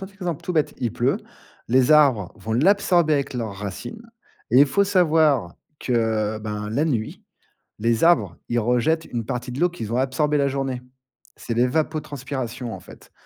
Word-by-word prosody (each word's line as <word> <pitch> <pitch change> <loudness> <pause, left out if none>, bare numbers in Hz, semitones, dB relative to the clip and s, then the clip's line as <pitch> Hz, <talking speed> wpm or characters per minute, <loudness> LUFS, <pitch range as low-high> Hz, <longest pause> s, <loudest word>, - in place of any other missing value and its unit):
simple 195 +1 -9
exemple 180 -6 -4
tout 180 - -3
bête, 155 -3 0
il 120 -4 -2
pleut, - - 0 0.5
les 130 +3 +4
arbres 130 -11 +4
vont 110 - -5
l'absorber 175 - +3
avec 140 -2 -2
leurs 115 -4 -3
racines, 100 - -7 0.5
et 125 - +5
il 145 - +7
faut 170 +9 +2
savoir 160 - +2 0.2
que, 110 -3 0
ben, 105 -1 -5
la 140 +8 +1
nuit, 120 -9 -2 0.6
les 115 +3 +2
arbres, 115 - +3
ils 120 0 +1
rejettent 125 +8 +1
une 115 -2 -4
partie 125 +1 -4
de 125 - -6
l'eau 175 - +4
qu'ils 115 -11 -6
ont - - 0
absorbée 135 +3 +1
la 140 - +2
journée. 135 -2 -3 0.6
C'est 115 - -5
l'évapotranspiration, 135 -2 -2
en - - -7
fait. - - -16
130 Hz, 170 wpm, -23 LUFS, 115-155 Hz, 0.6 s, il